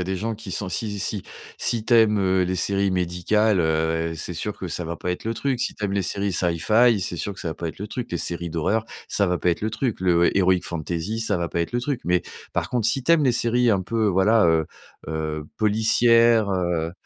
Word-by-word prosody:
a - - -1
des 95 +1 -2
gens 110 +4 -3
qui 105 -3 -8
sont 95 -1 -2
si 105 +1 -3
si 100 0 -2 0.4
si 115 -2 -1
tu 120 - -1
aimes, 110 -2 +5
heu, 95 -1 +2
les 90 +1 -2
séries 100 +2 +1
médicales, 95 +3 +1
heu, 80 0 0
c'est 90 - -4
sûr 100 +5 -4
que 90 - -6
ça 90 - -3
va 85 +1 -4
pas 90 - -4
être 90 - -4
le 115 +1 -2
truc. 125 +2 -1
Si - - -1
tu 105 - -5
aimes 100 - -1
les 100 - +1
séries 100 +1 -2
Sci-Fi, 105 +7 +3
c'est 90 -2 -3
sûr 100 - -3
que - - -9
ça 85 - -3
va 80 - -4
pas 85 - -4
être 80 - -9
le 105 - -5
truc. 125 +2 -6
Les 85 - -1
séries 85 0 -3
d'horreur, 95 +7 -1 0.2
ça 100 - +1
va 90 0 +1
pas 90 - +1
être 85 - -2
le 110 - -1
truc. 115 -1 -2
Le 85 -2 +3
heroic 95 -2 +3
fantasy, 85 +6 -3
ça 105 -3 +1
va 85 -1 -2
pas 85 - -1
être 85 - -3
le 120 - 0
truc. 140 -1 -2
Mais, 90 0 +2 0.3
par - - -2
contre, 120 -4 +1
si 135 - 0
tu 165 - +3
aimes 160 -3 +4
les 130 - +3
séries 120 0 +2
un 100 -4 +2
peu, 110 +3 -1
voilà, 100 +1 +4
heu 80 -1 +3 0.4
heu, 80 -1 -3
policières, 115 +1 +4
heu. 85 -3 -1
95 Hz, 255 wpm, -23 LUFS, 85-110 Hz, 0.4 s, aimes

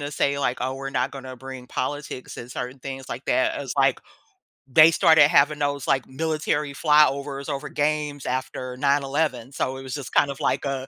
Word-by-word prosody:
to 145 0 -4
say, 140 -1 0
like, 130 -3 0
"Oh, 130 +1 -2
we're 135 0 -5
not 125 0 0
gonna 130 -2 -8
bring 130 0 -9
politics 130 0 -5
and 120 - -8
certain 125 +2 -5
things 135 0 -7
like - - -7
that" - - +1
is - - -5
like - - +3 0.7
they 155 +5 +7
started 160 -2 +6
having 150 -1 +3
those, 145 -2 -1
like, 135 -2 +1
military 150 0 -2
flyovers 140 -1 +2
over 140 -1 -3
games 150 -1 -1
after 130 0 -4
9/11, 140 -2 0
so 135 -1 -2
it 135 - -8
was 130 -1 -7
just 140 -3 -6
kind 140 - +3
of 140 - -9
like - - 0
a 135 -2 -3
140 Hz, 195 wpm, -24 LUFS, 130-145 Hz, 0.7 s, they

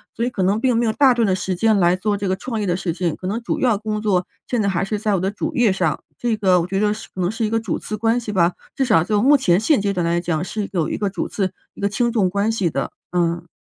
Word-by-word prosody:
所 230 - -2
以 240 - +1
可 200 -6 -2
能 200 +4 +1
并 250 -2 +2
没 235 - +2
有 220 - +1
大 275 +2 +5
段 235 -2 +2
的 190 - +2
时 185 0 -2
间 215 +3 +3
来 175 -1 +4
做 205 +3 -1
这 200 -1 -3
个 185 - +1
创 225 +3 -4
业 205 - -2
的 175 0 +1
事 175 -3 -2
情， 170 -2 -1
可 - - -10
能 210 +5 -2
主 230 - -2
要 235 -6 +2
工 215 0 -3
作 195 -4 0 0.2
现 245 -3 0
在 200 - +1
还 190 0 0
是 210 +1 -2
在 210 -1 +1
我 - - 0
的 190 +2 -1
主 310 +9 -4
业 240 -6 +4
上。 165 -5 -1 0.2
这 235 -2 0
个 185 -4 +3
我 170 - -3
觉 195 +1 -1
得 210 0 +2
是 215 - -9
可 - - -7
能 180 +1 +1
是 225 0 -2
一 - - -3
个 225 +1 +1
主 220 -6 -3
次 215 - -5
关 225 +3 +1
系 225 -3 -5
吧， 175 -3 +2 0.2
至 270 - +1
少 165 -9 +4
就 210 +3 +1
目 285 +3 +6
前 180 -9 +3
现 225 +2 +2
阶 200 0 0
段 180 -3 -1
来 170 +1 +1
讲 170 -2 -1
是 205 +2 -4
有 170 -6 0
一 - - -2
个 205 - -1
主 190 -3 -3
次， 190 -3 -2 0.2
一 - - -12
个 200 - +1
轻 235 +3 0
重 210 -6 +2
关 200 +4 0
系 200 -6 0
的， 140 -3 -3 0.2
嗯。 170 -1 0
200 Hz, 340 characters per minute, -21 LUFS, 180-225 Hz, 0.2 s, 目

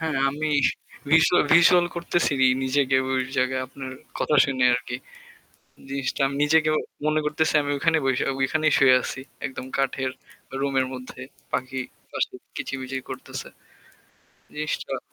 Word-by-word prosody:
হ্যাঁ 160 -3 -1
আমি 155 +2 -2 0.6
ভিজুয়া 165 +2 +5
ভিজুয়াল 175 +1 +6
করতেছি 170 -2 0 0.3
নিজেকে 130 0 +2
ওই 130 -1 +1 0.2
জায়গায় 130 0 +1
আপনার 130 0 -8 0.3
কথা 150 - +1
শুনে 130 -2 0
আরকি 125 0 -3 0.9
জিনিসটা 140 +1 -2
আমি 140 - -5
নিজেকে 155 +1 +3 0.4
মনে 155 0 +2
করতেছি 155 +1 +1
আমি 145 0 -2
ওখানেই 160 +1 +2
বইসা 130 -1 +1
ঐখানেই 155 +3 +1
শুয়ে 130 -1 +6
আছি। 130 - -5 0.3
একদম 130 -1 -6
কাঠের 135 -1 0 0.5
রুমের 135 -1 +1
মধ্যে 125 0 -9 0.3
পাখি 130 0 -2 0.3
পাশে - - -2 0.2
কিচিমিচি 135 0 -4
করতেছে। - - -7 1.1
নিশ্চয়। 155 0 -3
135 Hz, 125 wpm, -24 LUFS, 130-155 Hz, 1.1 s, ভিজুয়াল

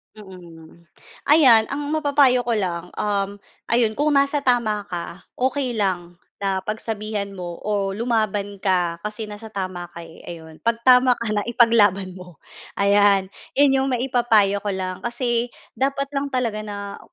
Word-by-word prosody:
Mm, 170 -5 -14 0.4
ayan 265 -7 +6
ang 285 +1 -3
mapapayo 285 -5 +3
ko 240 - -2
lang, 180 -5 -2
uhm, 200 -1 -1 0.3
ayun 230 -2 +2
kung 300 +1 +1
nasa 280 0 +2
tama 225 -5 +1
ka, 175 +1 -6 0.2
okey 260 0 0
lang 180 -5 -2 0.2
na 195 -1 -1
pagsabihan 215 0 -4
mo 180 -3 -7
o 200 -2 -1
lumaban 210 -3 -1
ka 175 -3 0
kasi 215 +1 -6
nasa 210 +1 -8
tama 185 -4 -5
ka, 170 -1 -10
eh, 165 0 -14
ayun. 160 -2 -10
'Pag 230 0 -1
tama 250 0 +6
ka 230 -2 -3
na, 205 0 -1
ipaglaban 220 -6 +3
mo, 180 -4 -14 0.3
ayan. 200 -1 +3 0.2
Yan 280 -1 +5
yung 265 - 0
maipapayo 240 -6 +2
ko 205 - -7
lang, 185 -1 -4
kasi 240 0 -1 0.3
dapat 275 +1 -1
lang 280 0 -2
talaga 250 -5 -1
na, 200 -1 -7
210 Hz, 150 wpm, -22 LUFS, 190-245 Hz, 0.4 s, ayan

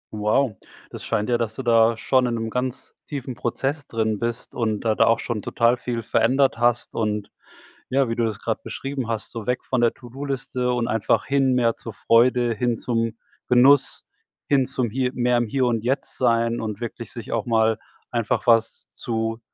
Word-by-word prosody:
Wow, 105 +2 +1 0.3
das - - -8
scheint 105 - -1
ja, 120 -1 +2
dass 110 -2 -2
du 135 - -5
da 115 -1 +4
schon 130 +1 +2
in 120 - -1
‘nem 115 0 -3
ganz 125 +1 -3
tiefen 135 -3 -5
Prozess 135 +5 -3
drin 110 -2 -1
bist 120 0 -4
und 110 -3 -1
da 110 -1 +1
da - - +3
auch 115 - +4
schon 115 -3 -3
total 115 +4 +2
viel 120 -2 -4
verändert 130 +3 +2
hast 120 0 +1
und 105 -2 -2 0.6
ja, 135 -1 +2
wie 115 - -2
du 120 - +1
das 110 -3 -3
grad - - -2
beschrieben 135 -2 -4
hast, 115 -2 -3
so 115 -3 -6
weg 125 0 -1
von 130 - 0
der 120 -1 +3
ToDo-Liste 130 -1 -3
und 120 -1 -1
einfach 110 -1 +1
hin 135 -2 +2
mehr 120 -2 +2
zur 115 - -8
Freude, 120 +5 +3
hin 120 +2 0
zum 115 -1 -1 0.3
Genuss, 130 +3 +4 0.5
hin 135 -3 +3
zum 130 -3 -2
hier 125 +2 -1
mehr 125 0 +2
im 120 0 +1
Hier 130 +4 0
und 115 -2 0
Jetzt 135 +2 -2
sein 115 -1 +2
und 110 -1 -4
wirklich 120 0 -6
sich 115 -3 -8
auch 115 0 -1
mal 110 -1 +2 0.3
einfach 120 -1 -1
was 115 -1 +2
zu 115 -1 -3
120 Hz, 195 wpm, -23 LUFS, 115-125 Hz, 0.6 s, da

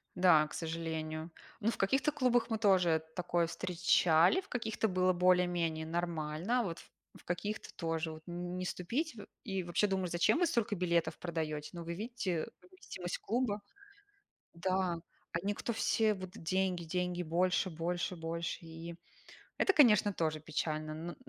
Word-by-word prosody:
Да, 175 -4 +6
к - - -12
сожалению. 160 -1 -4 0.3
Ну, 220 +2 +2
в - - -6
каких-то 270 +9 +2
клубах 250 -4 +2
мы 225 - 0
тоже 185 -6 +4
такое 175 -1 +1
встречали, 170 - +3
в - - -20
каких-то 220 -2 -1
было 185 -1 +2
более-менее 175 -3 +2
нормально. 170 +6 -1
Вот 170 -5 -4
в - - -16 0.3
в - - -20
каких-то 205 +5 -3
тоже 165 -2 -2
вот 155 0 -10
н 175 +1 -5
не 185 - -3
ступить. 240 - -2
Во 205 - -8 0.2
и 195 -3 -2
вообще 175 +4 +1
думаешь: 190 -2 -1
"Зачем 175 - +3
вы 350 - +4
столько 230 - 0
билетов 170 -2 +1
продаете? 155 -3 -3
Ну 170 -1 -6
вы 170 +1 -4
видите 200 -4 -2
вместимость 365 - -6
клуба". 225 -3 -1 0.9
Да. 185 -1 0 0.3
Они- 190 +4 0
кто 235 - -3
все: 220 -1 +2
вот 185 -2 -7
деньги, 185 +1 -1
деньги, 180 +1 -1
больше, 180 +3 +2
больше, 175 +2 -2
больше. 165 0 -3
И 165 +1 -8 0.6
это, 390 - +3
конечно, 215 - +6
тоже 155 -3 -1
печально. 155 0 -2
Но 165 +2 -6
175 Hz, 155 wpm, -33 LUFS, 165-205 Hz, 0.9 s, Да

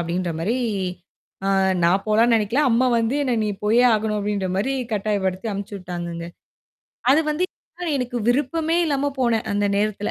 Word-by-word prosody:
அப்பிடின்றமாரி, 170 +4 -2 0.9
ஆ - - +1 0.4
நான் 185 +3 +3
போலான்னு 225 +2 +4
நினைக்கல. 225 +7 +1
அம்மா 240 +3 +3
வந்து 230 +4 0
என்ன 255 -3 0
நீ - - -1 0.2
போயே 230 +4 +4
ஆகணும் 215 0 -1
அப்பிடின்றமாரி 200 +3 -1 0.2
கட்டாயப்படுத்தி 200 -1 -1
அனுப்பிச்சு 200 +1 -5
விட்டாங்கங்க. 170 -2 -6 0.8
அது 305 - +4
வந்து 310 +4 0 0.5
எனக்கு 250 -1 -3
விருப்பமே 310 +6 +1
இல்லாம 285 -2 0
போனேன். 230 -3 +1
அந்த 205 0 +1
நேரத்துல. 210 0 -1
215 Hz, 135 wpm, -22 LUFS, 190-245 Hz, 0.9 s, போலான்னு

